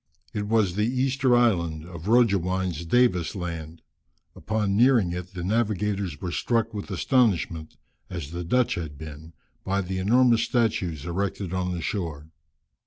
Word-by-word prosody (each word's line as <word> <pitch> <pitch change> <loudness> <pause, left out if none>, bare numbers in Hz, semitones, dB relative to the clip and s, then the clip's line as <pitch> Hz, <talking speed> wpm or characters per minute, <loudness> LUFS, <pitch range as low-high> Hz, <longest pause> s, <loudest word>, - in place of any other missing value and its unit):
It 105 -1 -3
was 105 -5 +2
the 105 +3 +1
Easter 130 0 +2
Island, 85 -10 +1
of 85 0 -9
Roggewein's 95 -7 +2
Davis' 90 -6 +2
Land. 85 -3 -6 0.5
Upon 105 -2 -1
nearing 115 -5 +4
it, 90 +2 -6
the 90 - -4
navigators 100 -4 -1
were 90 - -4
struck 115 +3 0
with 105 -1 -6
astonishment, 95 - +1 0.3
as 80 -5 -6
the 85 +1 -4
Dutch 125 +8 +2
had 80 -4 -5
been, 80 +1 -10 0.3
by 100 +1 0
the 95 0 -3
enormous 115 +4 +4
statues 90 - 0
erected 95 +1 -3
on 90 0 -1
the 85 -2 -4
shore. 80 -6 -4
95 Hz, 145 wpm, -25 LUFS, 85-110 Hz, 0.5 s, nearing